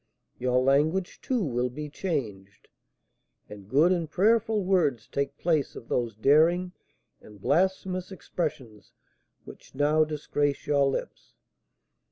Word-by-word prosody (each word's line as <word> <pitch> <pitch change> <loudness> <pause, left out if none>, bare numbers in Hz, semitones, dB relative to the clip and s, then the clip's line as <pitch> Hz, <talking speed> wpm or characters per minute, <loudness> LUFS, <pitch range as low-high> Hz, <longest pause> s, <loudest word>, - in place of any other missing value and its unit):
Your 125 0 +1
language, 150 +8 +1
too, 250 -5 -1
will 125 -4 -1
be 150 +4 -6
changed, 115 - -5 0.8
and 100 -1 -12
good 150 +9 +4
and 170 -4 -1
prayerful 215 +3 +2
words 155 - +1
take 140 0 -3
place 160 -5 0
of 115 - -11
those 120 -4 -1
daring 160 - +3 0.5
and 105 -1 -15
blasphemous 185 - 0
expressions 145 - -5 0.5
which - - -14
now 150 +3 +3
disgrace 145 -2 -2
your 140 -1 +2
lips. 135 - -5
150 Hz, 120 wpm, -27 LUFS, 125-180 Hz, 0.8 s, good